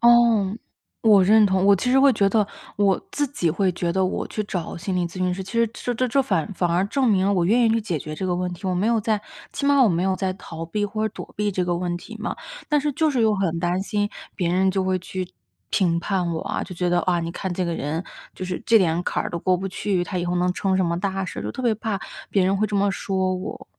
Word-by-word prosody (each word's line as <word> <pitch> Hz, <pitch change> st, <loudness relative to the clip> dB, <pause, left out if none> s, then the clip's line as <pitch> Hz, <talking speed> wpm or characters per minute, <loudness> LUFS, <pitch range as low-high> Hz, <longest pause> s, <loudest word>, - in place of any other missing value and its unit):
哦， 235 Hz, -4 st, +5 dB, 0.5 s
我 210 Hz, -4 st, +6 dB
认 215 Hz, +2 st, +6 dB
同， 190 Hz, 0 st, +1 dB
我 200 Hz, 0 st, +6 dB
其 250 Hz, +7 st, -1 dB
实 265 Hz, -, +5 dB
会 275 Hz, -1 st, +6 dB
觉 200 Hz, -3 st, +2 dB
得 210 Hz, 0 st, +2 dB, 0.3 s
我 200 Hz, -2 st, +2 dB
自 290 Hz, -5 st, 0 dB
己 180 Hz, -, -1 dB
会 185 Hz, +3 st, +1 dB
觉 170 Hz, 0 st, -2 dB
得 190 Hz, 0 st, +2 dB
我 185 Hz, -, -2 dB
去 215 Hz, -, -3 dB
找 180 Hz, -5 st, -4 dB
心 180 Hz, +2 st, -3 dB
理 175 Hz, -1 st, +1 dB
咨 170 Hz, -, -11 dB
询 185 Hz, -1 st, 0 dB
师， 190 Hz, +1 st, -4 dB
其 195 Hz, -, -10 dB
实 230 Hz, 0 st, +3 dB
这 245 Hz, 0 st, -3 dB
这 255 Hz, +2 st, 0 dB
这 275 Hz, +4 st, +3 dB
反 250 Hz, -11 st, +1 dB
而 205 Hz, -, -8 dB
反 175 Hz, 0 st, 0 dB
而 175 Hz, +3 st, +2 dB
证 260 Hz, +1 st, +1 dB
明 190 Hz, -3 st, +3 dB
了 200 Hz, -, +3 dB
我 180 Hz, -3 st, +2 dB
愿 235 Hz, +6 st, +3 dB
意 -, -, +4 dB
去 225 Hz, 0 st, +2 dB
解 180 Hz, -7 st, -2 dB
决 155 Hz, +2 st, -6 dB
这 185 Hz, -, -3 dB
个 180 Hz, -, 0 dB
问 180 Hz, 0 st, -2 dB
题， 175 Hz, +2 st, -7 dB
我 185 Hz, -, 0 dB
没 190 Hz, +5 st, +1 dB
有 230 Hz, -1 st, +2 dB
在 215 Hz, 0 st, 0 dB, 0.3 s
起 280 Hz, -, -4 dB
码 285 Hz, -1 st, +5 dB
我 235 Hz, -, +5 dB
没 175 Hz, -2 st, +1 dB
有 190 Hz, 0 st, +1 dB
在 185 Hz, 0 st, -1 dB
逃 165 Hz, -3 st, -8 dB
避 205 Hz, +5 st, -1 dB
或 215 Hz, +2 st, -1 dB
者 215 Hz, -, -5 dB
躲 -, -, -9 dB
避 210 Hz, 0 st, 0 dB
这 180 Hz, -1 st, 0 dB
个 175 Hz, -1 st, 0 dB
问 175 Hz, 0 st, -2 dB
题 225 Hz, +5 st, -10 dB
嘛。 220 Hz, -, -3 dB, 0.3 s
但 300 Hz, -1 st, +3 dB
是 295 Hz, +1 st, 0 dB
就 315 Hz, +2 st, +2 dB
是 260 Hz, -, 0 dB
又 220 Hz, -1 st, +3 dB
很 170 Hz, -4 st, -1 dB
担 175 Hz, +1 st, 0 dB
心 205 Hz, 0 st, -1 dB, 0.3 s
别 175 Hz, -3 st, -1 dB
人 190 Hz, +1 st, +3 dB
就 190 Hz, 0 st, 0 dB
会 185 Hz, 0 st, 0 dB
去 185 Hz, 0 st, -5 dB, 0.4 s
评 170 Hz, -3 st, +2 dB
判 180 Hz, -4 st, -1 dB
我 160 Hz, -, -2 dB
啊， -, -, -3 dB
就 185 Hz, -, -9 dB
觉 180 Hz, +1 st, -1 dB
得： 175 Hz, -, +3 dB
“啊， 175 Hz, -2 st, +1 dB
你 165 Hz, 0 st, -3 dB
看 185 Hz, +1 st, -4 dB
这 180 Hz, +1 st, -1 dB
个 170 Hz, -, -1 dB
人， 160 Hz, +4 st, -3 dB, 0.3 s
就 185 Hz, -, -6 dB
是 180 Hz, -1 st, -4 dB
这 230 Hz, -, +6 dB
点 170 Hz, -2 st, +1 dB
坎 -, -, -1 dB
儿 -, -, -5 dB
都 170 Hz, -, -3 dB
过 185 Hz, +2 st, +2 dB
不 195 Hz, +2 st, -4 dB
去， 185 Hz, -1 st, -1 dB
她 180 Hz, +1 st, -3 dB
以 175 Hz, -, -1 dB
后 175 Hz, 0 st, -1 dB
能 180 Hz, +1 st, +1 dB
成 190 Hz, +1 st, 0 dB
什 190 Hz, -, +2 dB
么 170 Hz, 0 st, -1 dB
大 195 Hz, 0 st, -2 dB
事”， -, -, -6 dB
就 -, -, -3 dB
特 255 Hz, -, -6 dB
别 235 Hz, -3 st, +3 dB
怕 220 Hz, -2 st, -2 dB, 0.3 s
别 195 Hz, -, +2 dB
人 190 Hz, +1 st, +2 dB
会 215 Hz, +2 st, +1 dB
这 210 Hz, -, -5 dB
么 200 Hz, 0 st, +2 dB
说 190 Hz, -1 st, -1 dB
我。 185 Hz, -, -7 dB
190 Hz, 310 characters per minute, -23 LUFS, 180-215 Hz, 0.5 s, 我